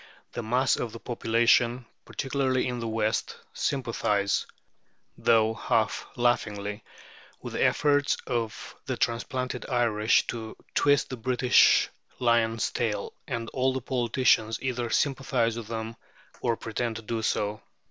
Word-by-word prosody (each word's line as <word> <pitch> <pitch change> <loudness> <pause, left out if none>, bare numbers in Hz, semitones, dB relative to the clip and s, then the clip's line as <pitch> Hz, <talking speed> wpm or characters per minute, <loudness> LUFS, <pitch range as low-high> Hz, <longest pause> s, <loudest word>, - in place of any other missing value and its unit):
The - - -4
mass 125 +3 +2
of 115 - -4
the 115 - -8
population, 120 +1 +2 0.2
particularly 135 -2 -1
in 125 -1 -3
the 115 - -3
West, 110 -1 -1 0.2
sympathize, 110 -6 0 0.7
though 110 -1 +3
half 110 -1 0
laughingly, 105 -4 0 0.6
with - - -6
the - - +1
efforts 145 -1 +3
of 115 -3 -3
the - - -2
transplanted 125 +2 -2
Irish 115 -3 +2
to 110 -2 -6 0.2
"twist 145 -1 +3
the 130 - -4
British 125 +1 +4 0.3
lion's 115 -2 +2
tail," 105 -4 -2
and 115 -1 -3
all 130 0 +1
the 130 - -1
politicians 120 -2 +2
either 125 -2 -2
sympathize 130 -4 +1
with 115 -2 -6
them, 115 0 -5 0.5
or 115 -2 0
pretend 115 0 -3
to 110 - -7
do 115 +1 -3
so. 105 -1 -1
115 Hz, 130 wpm, -27 LUFS, 110-125 Hz, 0.7 s, British